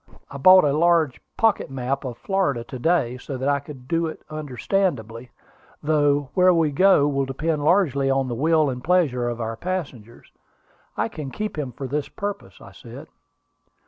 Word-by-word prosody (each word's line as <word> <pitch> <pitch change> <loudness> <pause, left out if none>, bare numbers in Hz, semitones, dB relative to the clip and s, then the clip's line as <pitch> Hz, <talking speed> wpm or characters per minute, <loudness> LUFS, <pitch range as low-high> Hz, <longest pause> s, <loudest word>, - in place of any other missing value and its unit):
I 140 - -7
bought 185 +5 +8
a 145 -2 +2
large 165 -3 +2 0.2
pocket 225 -2 +1
map 135 +1 -3
of 120 -2 -6
Florida 180 -11 -1
to 125 +2 -9
day, 125 -5 +1
so 135 +1 -6
that 130 +2 -3
I 140 0 +2
could 135 -3 -12
do 165 +2 0
it 160 - -8
understandingly, 130 - -2 0.5
though 145 -2 +1
where 185 0 +5
we 160 -3 +2
go 150 -1 +4
will 140 -1 0
depend 150 +3 -2
largely 150 -5 +2
on 135 0 +1
the 120 - -3
will 155 +3 +2
and 125 0 -7
pleasure 145 -9 +1
of 120 0 -5
our 115 0 -3
passengers. 135 - -6 0.7
I - - 0
can 145 -3 -7
keep 215 +9 -5
him 145 -5 -4
for 135 +3 -7
this 145 +2 -3
purpose," 205 0 -6
I - - -13
said. - - -12
145 Hz, 175 wpm, -23 LUFS, 130-165 Hz, 0.7 s, bought